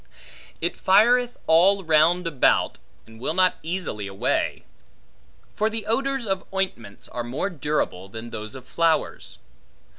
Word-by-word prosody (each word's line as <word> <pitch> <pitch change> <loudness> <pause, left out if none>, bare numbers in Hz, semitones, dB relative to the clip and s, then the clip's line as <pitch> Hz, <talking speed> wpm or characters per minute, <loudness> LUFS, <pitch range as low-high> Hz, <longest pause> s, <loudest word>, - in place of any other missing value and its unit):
It 170 - -1
fireth 240 +5 +4
all 190 +5 +4
round 165 +2 +3
about, 150 -6 +2 0.3
and 110 0 -15
will 135 +6 -2
not 185 0 +3
easily 160 - -4
away. 95 0 -1 0.9
For 215 +1 +1
the 220 -1 -5
odors 270 +2 0
of 195 -2 -1
ointments 185 - -4
are 120 - -4
more 130 +12 -3
durable, 145 - -2
than 115 +3 -8
those 110 +2 -6
of 130 -1 -10
flowers. 165 0 -1
165 Hz, 130 wpm, -24 LUFS, 125-195 Hz, 0.9 s, fireth